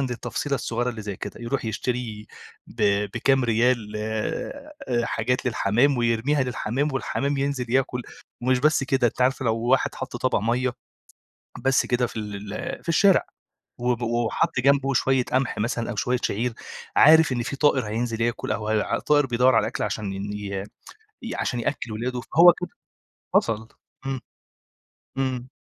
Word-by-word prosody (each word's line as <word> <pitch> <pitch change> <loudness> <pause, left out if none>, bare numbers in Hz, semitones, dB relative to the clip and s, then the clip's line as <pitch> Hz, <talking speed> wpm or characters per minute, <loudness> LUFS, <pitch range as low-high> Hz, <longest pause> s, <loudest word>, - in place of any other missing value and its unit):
للتفصيلة 125 +2 -2
الصغيرة 120 -1 -1
اللي 110 -2 -7
زي 100 -2 -5
كده. - - -7
يروح 120 +3 -2
يشتري 110 -1 -3 0.4
ب 115 - -6 0.3
بكام 135 -1 +2
ريال 115 -1 +1
آآ 110 - -4 0.3
حاجات 125 +3 -1
للحمام، 120 +4 +2
ويرميها 120 +4 +1
للحمام، 130 +3 -1
والحمام 140 +1 -1
ينزل 135 -3 -2
ياكل، 130 -1 +1 0.4
ومش 130 +1 +3
بس 150 0 +3
كده 135 -2 +2
أنتِ 120 - -3
عارفه 130 +1 +1
لو 115 -2 +2
واحد 125 +3 +1
حَط 130 -1 -6
طَبَق 130 +1 +1
مَيّة، 120 +4 0 0.9
بس 135 0 +3
كده 125 0 +1
في 125 - -13
ال 105 -1 -6
ال - - -5
في - - -7
الشارع، 190 +3 +4 0.5
وب 120 -1 0
وحَط 120 +1 0
جنبه 140 +1 +3
شوية 130 0 +2
قمح 130 0 0
مثلًا 115 +2 -1
أو - - -5
شوية 125 +5 0
شعير، 115 +4 -1 0.4
عارف 160 0 +7
إن 120 -2 0
في 140 - -4
طائر 135 -5 +2
هينزل 115 +1 -2
ياكل 120 0 -1
أو 105 +1 -2
هي 110 -1 0
طائر 145 -1 +4
بيدوّر 125 0 +3
على - - +3
أكل - - -3
عشان 105 -2 -3
إن 100 +1 -5
ي 100 -2 -4 0.6
ي 230 - -5
عشان 120 - -1
يأكّل 115 0 -3
ولاده. 125 +3 -3
فهو 170 +7 +6
كده 180 - -4 0.6
وصل. 110 0 +1 0.4
إمم. 135 -1 -2 1.0
إمم. 130 -2 -1
125 Hz, 160 wpm, -24 LUFS, 115-135 Hz, 1.0 s, عارف